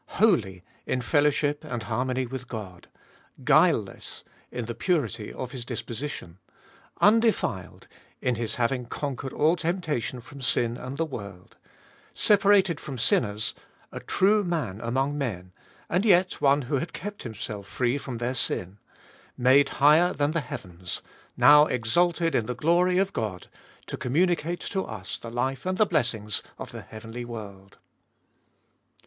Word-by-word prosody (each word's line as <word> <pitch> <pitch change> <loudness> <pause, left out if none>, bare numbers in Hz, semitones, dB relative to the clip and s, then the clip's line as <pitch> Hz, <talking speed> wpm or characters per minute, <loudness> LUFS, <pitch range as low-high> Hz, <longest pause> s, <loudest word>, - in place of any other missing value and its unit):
Holy, 105 - +2 0.2
in 130 - 0
fellowship 145 +2 +1
and 120 -3 -4
harmony 125 +4 -1
with 125 0 -7
God; 100 -7 -8 0.6
guileless, - - +2 0.3
in 120 -2 -4
the 120 - -4
purity 115 - -1
of 125 -1 -6
His 125 -2 -6
disposition; 115 - -6 0.6
undefiled, 210 - +2 0.3
in 125 - 0
His 115 -1 -2
having 125 0 0
conquered 135 0 -4
all 160 +3 +3
temptation 165 - -2
from 135 +4 -12
sin 120 -2 +1
and 130 +3 -7
the 165 - +1
world; 100 - -9 0.6
separated 195 -5 +4
from 135 -3 -7
sinners, 110 -3 +1 0.4
a - - -6
true 205 +2 +2
Man 145 - -2
among 135 +5 -1
men, 90 -9 -4 0.4
and 180 +4 +1
yet 185 -4 +3
one 140 0 +4
who 135 +3 -1
had 165 +4 -5
kept 205 +2 -6
Himself 110 -3 -6
free 125 +5 0
from 130 -3 -6
their 120 +2 -2
sin; 100 -5 -1 0.6
made 130 +3 +5
higher 155 +5 +5
than 145 +1 0
the 165 0 0
heavens, 90 -8 -6 0.3
now 150 +1 +8
exalted 165 +8 +1
in 110 - +1
the 125 - -3
glory 175 +6 +3
of 195 +1 +1
God, 105 -5 -3 0.4
to - - -5
communicate 170 +5 0
to 190 -1 -2
us 100 -4 -6
the 115 - -8
life 130 +3 -2
and 185 0 -1
the 215 - +5
blessings 115 - 0 0.2
of - - -7
the - - -7
heavenly 115 +2 -8
world. 100 -5 -9
130 Hz, 145 wpm, -26 LUFS, 115-165 Hz, 0.6 s, now